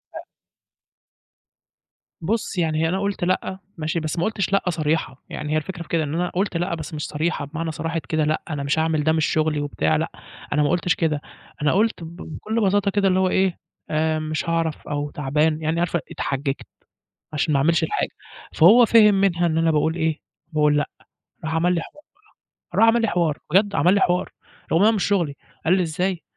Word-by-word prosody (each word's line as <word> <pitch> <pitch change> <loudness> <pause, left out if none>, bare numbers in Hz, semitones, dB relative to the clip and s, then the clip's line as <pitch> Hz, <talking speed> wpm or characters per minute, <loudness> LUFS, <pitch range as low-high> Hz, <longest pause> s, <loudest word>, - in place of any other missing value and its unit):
أ - - -5 2.0
بُصّ، 210 +3 -2
يعني 160 -1 +1
أنا 190 +3 0
قُلت: 200 -2 -2
"لأ." 185 +1 -1 0.2
ماشي، 155 +1 -1
بس 155 +1 -3
ما 170 - 0
قُلتش 200 -3 -1
لأ 195 - +3
صريحة، 155 -5 -1
يعني 150 0 -4
هي - - +3
الفكرة 175 +3 -4
في - - -20
كده 165 -2 +1
إن 145 0 -4
أنا 175 +2 0
قُلت 185 -1 -1
لأ 175 +1 -1
بس 160 -1 -7
مش 150 -2 -4
صريحة 155 0 -2
بمعنى 160 +3 -4
صراحة 165 +1 -3
كده 155 -1 +1
لأ 155 +1 0
أنا 145 -3 -3
مش 140 +3 0
هاعمل 160 -1 +1
ده 160 - +3
مش 160 -1 +2
شُغلي 155 -1 +1
وبتاع، 140 - 0
لأ - - -1 0.4
أنا 150 0 +3
ما 145 - +2
قُلتش 175 +1 +1
كده، 155 -3 0 0.4
أنا 145 -1 +2
قُلت 210 -1 +1
ب 165 +1 -9 0.2
بكُلّ 220 +7 -2
بساطة 200 +1 +2
كده 200 0 +2
اللي 185 0 +3
هو 190 0 +2
إيه 190 -2 +1 0.3
آآ، 155 0 +1
مش 155 +1 -3
هاعرف 165 -2 -1
أو 145 0 -2
تعبان، 150 +3 0
يعني 160 +2 0
عارف 175 0 0
أ - - +3
إتحججت 135 0 -2 0.7
عشان 150 +1 0
ما 140 - +3
أعملش 165 +4 +2
الحاجة، 420 - -1 0.4
فهو 215 +9 +7
فِهِم 215 -2 +6
منها 185 -3 +2
إن 160 -2 +1
أنا 165 0 +3
باقول 160 +1 +1
إيه، 160 -2 -1 0.3
باقول 150 -1 +3
لأ، 145 - 0 0.6
راح 160 0 -2
عمل 175 +2 +2
لي 170 - 0
حوار - - -10 0.6
بقى - - -6
راح 225 - +7
عمل 230 +1 +4
لي 225 - +2
حوار، 170 -6 +1
بجد 200 +3 +3
عمل 180 - +4
لي 200 - +2
حوار، 180 -1 +1 0.4
رغم 165 +4 +4
هو 220 - +6
مش 210 -4 0
شُغلي 175 -8 +1 0.3
قال 165 - +4
لي: 185 - +2
"إزاي، 175 +2 -2
165 Hz, 205 wpm, -23 LUFS, 155-185 Hz, 2.0 s, فهو